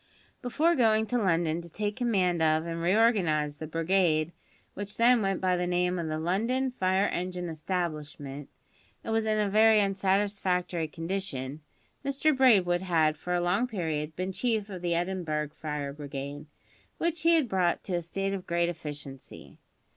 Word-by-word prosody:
Before 310 Hz, +7 st, +2 dB
going 220 Hz, -3 st, +3 dB
to 245 Hz, +2 st, 0 dB
London 170 Hz, -3 st, +1 dB
to 170 Hz, -, -12 dB
take 205 Hz, +4 st, -3 dB
command 190 Hz, -9 st, +1 dB
of 155 Hz, 0 st, +2 dB
and 165 Hz, 0 st, -4 dB
reorganise 170 Hz, -7 st, +2 dB
the 155 Hz, -, -6 dB
brigade 165 Hz, -1 st, +1 dB, 0.4 s
which 205 Hz, 0 st, -6 dB
then 235 Hz, 0 st, +5 dB
went 195 Hz, -2 st, 0 dB
by 185 Hz, -1 st, +2 dB
the 180 Hz, 0 st, -1 dB
name 180 Hz, 0 st, +1 dB
of 165 Hz, -, -3 dB
the 155 Hz, 0 st, -2 dB
London 230 Hz, +11 st, 0 dB
Fire 190 Hz, -4 st, +1 dB
Engine 180 Hz, 0 st, -3 dB
Establishment, 150 Hz, -4 st, -4 dB, 0.5 s
and 225 Hz, -, -3 dB
was 225 Hz, 0 st, +1 dB
in 215 Hz, 0 st, +2 dB
a 210 Hz, -1 st, +2 dB
very 215 Hz, +2 st, +5 dB
unsatisfactory 195 Hz, -3 st, 0 dB
condition, 155 Hz, -4 st, -4 dB, 0.4 s
Mr 280 Hz, +2 st, +1 dB
Braidwood 195 Hz, -10 st, +4 dB
had, 160 Hz, -4 st, +2 dB
for 180 Hz, +3 st, -3 dB
a 175 Hz, -, +1 dB
long 185 Hz, +8 st, +1 dB
period, 160 Hz, -8 st, -3 dB
been 185 Hz, +1 st, -3 dB
chief 215 Hz, +1 st, -1 dB
of 185 Hz, -2 st, -6 dB
the 175 Hz, -1 st, 0 dB
Edinburgh 170 Hz, -4 st, -2 dB
Fire 150 Hz, -2 st, -5 dB
Brigade, 145 Hz, 0 st, -7 dB, 0.5 s
which 335 Hz, -1 st, -1 dB
he 335 Hz, +1 st, +5 dB
had 310 Hz, -6 st, +2 dB
brought 185 Hz, -4 st, +1 dB
to 190 Hz, -, -5 dB
a 175 Hz, -, 0 dB
state 195 Hz, +4 st, -3 dB
of 190 Hz, -2 st, -5 dB
great 170 Hz, 0 st, +1 dB
efficiency. 145 Hz, -5 st, -8 dB
180 Hz, 165 wpm, -28 LUFS, 160-210 Hz, 0.5 s, then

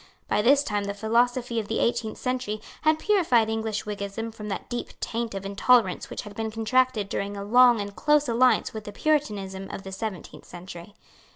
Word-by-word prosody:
By -, -, +2 dB
this 275 Hz, +6 st, +5 dB
time 205 Hz, -5 st, -2 dB
the 200 Hz, 0 st, -4 dB
philosophy 235 Hz, +2 st, +1 dB
of 215 Hz, -, -5 dB
the 225 Hz, -, -1 dB
eighteenth 220 Hz, -2 st, 0 dB
century 250 Hz, -4 st, -2 dB, 0.2 s
had 310 Hz, 0 st, +3 dB
purifed 380 Hz, -1 st, +1 dB, 0.2 s
English 220 Hz, -1 st, -2 dB
Whiggism 210 Hz, +2 st, -4 dB
from 210 Hz, -1 st, -8 dB
that 195 Hz, -, -4 dB
deep 240 Hz, -1 st, -6 dB
taint 230 Hz, -2 st, -3 dB
of 195 Hz, 0 st, -5 dB
intolerance 200 Hz, 0 st, +2 dB
which -, -, -5 dB
had 210 Hz, -, -10 dB
been 220 Hz, 0 st, -3 dB
contracted 225 Hz, 0 st, +1 dB
during 200 Hz, +1 st, -3 dB
a 200 Hz, -, -4 dB
long 245 Hz, +2 st, +6 dB
and 200 Hz, 0 st, -5 dB
close 295 Hz, -1 st, +3 dB
alliance 245 Hz, +2 st, +3 dB
with 215 Hz, -1 st, -7 dB
the 205 Hz, -, -6 dB
Puritanism 200 Hz, -11 st, -1 dB
of 195 Hz, -, -7 dB
the 190 Hz, -, -8 dB
seventeenth 190 Hz, -1 st, -6 dB
century. 180 Hz, +2 st, -10 dB
220 Hz, 190 wpm, -26 LUFS, 200-245 Hz, 0.2 s, long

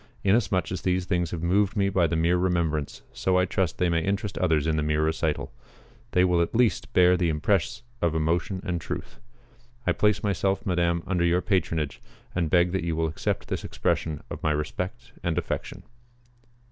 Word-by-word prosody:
Inasmuch 95 Hz, -4 st, +2 dB
as 95 Hz, -, -3 dB
these 90 Hz, 0 st, 0 dB
things 90 Hz, -3 st, 0 dB
have 85 Hz, -1 st, -5 dB
moved 100 Hz, +4 st, +2 dB
me 100 Hz, -1 st, +3 dB
by 90 Hz, -3 st, +2 dB
the 85 Hz, -, -1 dB
mere 85 Hz, +2 st, +2 dB
remembrance, 85 Hz, -5 st, -1 dB
so 95 Hz, -1 st, +1 dB
I 90 Hz, -, +4 dB
trust 95 Hz, -2 st, -1 dB
they 90 Hz, -, +2 dB
may 85 Hz, -1 st, +1 dB
interest 100 Hz, +1 st, -2 dB
others 80 Hz, -5 st, +2 dB
in 80 Hz, -1 st, +1 dB
the 75 Hz, -, +1 dB
mere 75 Hz, 0 st, +1 dB
recital. 80 Hz, -1 st, -1 dB, 0.6 s
They 90 Hz, 0 st, +5 dB
will 90 Hz, -2 st, +3 dB
at 85 Hz, -, -1 dB
least 120 Hz, -1 st, +2 dB
bear 90 Hz, 0 st, +6 dB
the 90 Hz, -2 st, +1 dB
impress 80 Hz, +6 st, 0 dB, 0.2 s
of 85 Hz, -2 st, +1 dB
emotion 85 Hz, +5 st, 0 dB
and 85 Hz, -2 st, -2 dB
truth. -, -, -6 dB, 0.7 s
I -, -, +3 dB
place 105 Hz, -1 st, +2 dB
myself, 100 Hz, -1 st, 0 dB
Madame, 85 Hz, -2 st, +1 dB
under 90 Hz, -2 st, 0 dB
your 85 Hz, +1 st, +3 dB
patronage, 80 Hz, -, -1 dB, 0.3 s
and 85 Hz, -3 st, 0 dB
beg 90 Hz, 0 st, +4 dB
that 95 Hz, -1 st, -1 dB
you 85 Hz, -1 st, -1 dB
will 80 Hz, 0 st, +1 dB
accept 80 Hz, -1 st, -2 dB
this -, -, -3 dB
expression 80 Hz, -3 st, -1 dB
of -, -, -6 dB
my 80 Hz, -, +1 dB
respect 90 Hz, +10 st, -4 dB
and 85 Hz, -3 st, -1 dB
affection. -, -, -3 dB
90 Hz, 190 wpm, -26 LUFS, 80-95 Hz, 0.7 s, bear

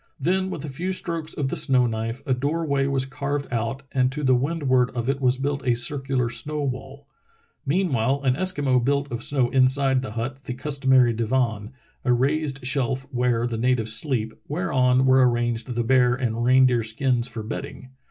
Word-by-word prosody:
Then 190 Hz, +2 st, 0 dB
with 155 Hz, -5 st, -5 dB
a -, -, -6 dB
few 170 Hz, +7 st, -3 dB
strokes 165 Hz, -3 st, -4 dB
of 140 Hz, -3 st, -1 dB
the -, -, -3 dB
snow 130 Hz, -2 st, +3 dB
knife 115 Hz, +2 st, -4 dB
a 135 Hz, -, +1 dB
door 145 Hz, +6 st, -1 dB
way 140 Hz, -2 st, 0 dB
was 135 Hz, -1 st, 0 dB
carved 140 Hz, +1 st, -3 dB
out 120 Hz, +3 st, -2 dB
and 130 Hz, -1 st, +1 dB
to 150 Hz, +2 st, -4 dB
the 130 Hz, -1 st, +4 dB
windward 130 Hz, -2 st, +1 dB
of 120 Hz, 0 st, -2 dB
it 135 Hz, 0 st, -1 dB
was 130 Hz, 0 st, +2 dB
built 140 Hz, +1 st, -2 dB
a 125 Hz, -2 st, +2 dB
circular 130 Hz, 0 st, 0 dB
snow 150 Hz, +5 st, -2 dB
wall. 135 Hz, +1 st, -6 dB, 0.6 s
Meanwhile 140 Hz, -5 st, 0 dB
an 130 Hz, -2 st, +3 dB
Eskimo 145 Hz, -7 st, +1 dB
built 140 Hz, +2 st, 0 dB
of 120 Hz, 0 st, -4 dB
snow 130 Hz, -4 st, +1 dB
inside 130 Hz, 0 st, +3 dB
the 110 Hz, -5 st, -6 dB
hut 130 Hz, +4 st, -5 dB
the 125 Hz, -, -4 dB
customary 130 Hz, -3 st, +2 dB
divan 115 Hz, -1 st, -1 dB
— -, -, -37 dB
a 125 Hz, -, +2 dB
raised 135 Hz, +1 st, -1 dB
shelf 130 Hz, 0 st, 0 dB
where 120 Hz, -2 st, 0 dB
the 120 Hz, -2 st, -3 dB
natives 115 Hz, -2 st, +1 dB
sleep 115 Hz, -4 st, 0 dB
— -, -, -39 dB
whereon 130 Hz, -6 st, +1 dB
were 130 Hz, -1 st, +5 dB
arranged 120 Hz, 0 st, -1 dB
the 120 Hz, -2 st, -2 dB
bear 125 Hz, 0 st, +3 dB
and 120 Hz, -3 st, -2 dB
reindeer 125 Hz, -1 st, +4 dB
skins 120 Hz, +2 st, 0 dB
for 110 Hz, -, -6 dB
bedding. 115 Hz, +3 st, -7 dB
130 Hz, 190 wpm, -23 LUFS, 120-140 Hz, 0.6 s, were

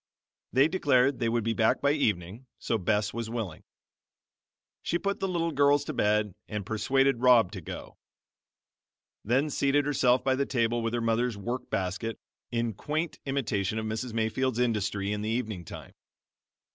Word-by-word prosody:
They 135 Hz, +4 st, +5 dB
declared 140 Hz, -6 st, +2 dB
they 115 Hz, -2 st, +1 dB
would 115 Hz, -1 st, 0 dB
be 115 Hz, +1 st, 0 dB
back 110 Hz, -1 st, +2 dB
by 140 Hz, +1 st, +2 dB
evening, 110 Hz, -, -1 dB
so 115 Hz, -, -1 dB
Bess 105 Hz, +2 st, 0 dB
was 115 Hz, -1 st, -4 dB
willing. 110 Hz, -9 st, -4 dB, 1.2 s
She 170 Hz, -, 0 dB
put 200 Hz, +2 st, -2 dB
the 195 Hz, -, -1 dB
little 170 Hz, -2 st, -1 dB
girls 145 Hz, 0 st, +3 dB
to -, -, -4 dB
bed 105 Hz, -1 st, +1 dB
and 105 Hz, -3 st, -4 dB
persuaded 125 Hz, +4 st, +1 dB
Rob 125 Hz, -6 st, +5 dB
to -, -, -7 dB
go; -, -, -8 dB, 1.3 s
then 135 Hz, +7 st, +1 dB
seated 140 Hz, +1 st, +2 dB
herself 130 Hz, -3 st, +3 dB
by 135 Hz, -, +2 dB
the 140 Hz, +1 st, 0 dB
table 120 Hz, -2 st, +1 dB
with 115 Hz, +1 st, -1 dB
her 120 Hz, -, -1 dB
mother's 115 Hz, 0 st, 0 dB
work 120 Hz, +5 st, -4 dB
basket, 100 Hz, +5 st, -2 dB, 0.3 s
in 115 Hz, -1 st, -1 dB
quaint 155 Hz, -, -3 dB
imitation 110 Hz, -7 st, -1 dB
of 110 Hz, -, -2 dB
Mrs. 110 Hz, +3 st, -3 dB
Mayfield's 115 Hz, +3 st, 0 dB
industry 105 Hz, -4 st, 0 dB
in 105 Hz, -, -3 dB
the 110 Hz, -, -2 dB
evening 110 Hz, -6 st, -2 dB
time. -, -, -10 dB
115 Hz, 165 wpm, -28 LUFS, 110-135 Hz, 1.3 s, They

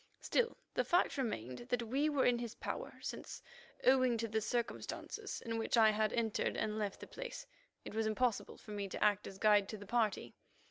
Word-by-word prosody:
Still, 475 Hz, 0 st, +1 dB, 0.2 s
the -, -, +2 dB
fact 355 Hz, 0 st, +3 dB
remained 130 Hz, -, -2 dB
that 245 Hz, -1 st, +1 dB
we 270 Hz, +7 st, +1 dB
were 285 Hz, -3 st, +2 dB
in 245 Hz, -1 st, +4 dB
his 235 Hz, -2 st, -5 dB
power, -, -, -5 dB
since -, -, -6 dB, 0.4 s
owing 255 Hz, -2 st, +5 dB
to 230 Hz, 0 st, -1 dB
the 220 Hz, 0 st, 0 dB
circumstances 245 Hz, -, -3 dB
in 225 Hz, 0 st, -1 dB
which 225 Hz, -, +1 dB
I 220 Hz, -1 st, +7 dB
had 215 Hz, 0 st, +1 dB
entered 225 Hz, -2 st, 0 dB
and 215 Hz, 0 st, -1 dB
left 205 Hz, -2 st, -3 dB
the -, -, -6 dB
place, -, -, -7 dB, 0.4 s
it -, -, -7 dB
was 220 Hz, 0 st, +1 dB
impossible 230 Hz, 0 st, 0 dB
for 215 Hz, -, -12 dB
me 205 Hz, -1 st, -3 dB
to -, -, -2 dB
act 210 Hz, -1 st, +3 dB
as 195 Hz, -, -8 dB
guide 205 Hz, -1 st, +4 dB
to 215 Hz, -, -4 dB
the 205 Hz, -, -10 dB
party. 220 Hz, 0 st, 0 dB
225 Hz, 200 wpm, -36 LUFS, 210-250 Hz, 0.4 s, I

